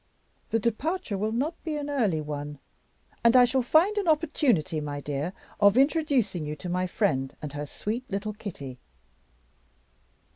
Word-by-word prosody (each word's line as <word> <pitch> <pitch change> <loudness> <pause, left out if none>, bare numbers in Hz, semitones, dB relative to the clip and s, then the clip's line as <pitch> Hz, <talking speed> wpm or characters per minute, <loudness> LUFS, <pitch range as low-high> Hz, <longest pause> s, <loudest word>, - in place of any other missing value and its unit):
The 225 - +2
departure 235 - -1
will 210 +3 -1
not 290 +9 -2
be 315 -2 -2
an 290 -1 -4
early 220 - +1
one; 145 -1 -5 0.7
and 235 +1 +6
I 250 -1 +9
shall 260 +2 +1
find 320 - +4
an 395 - -2
opportunity, 270 - +2
my 145 -1 -4
dear, 145 +4 -3 0.3
of 205 +2 +5
introducing 270 - +2
you 150 0 -4
to 175 - -7
my 180 +1 0
friend 140 -9 0
and 150 -2 -6
her 145 0 -4
sweet 235 - -4
little 210 +1 -3
Kitty." 140 - -7
210 Hz, 155 wpm, -27 LUFS, -, 0.7 s, I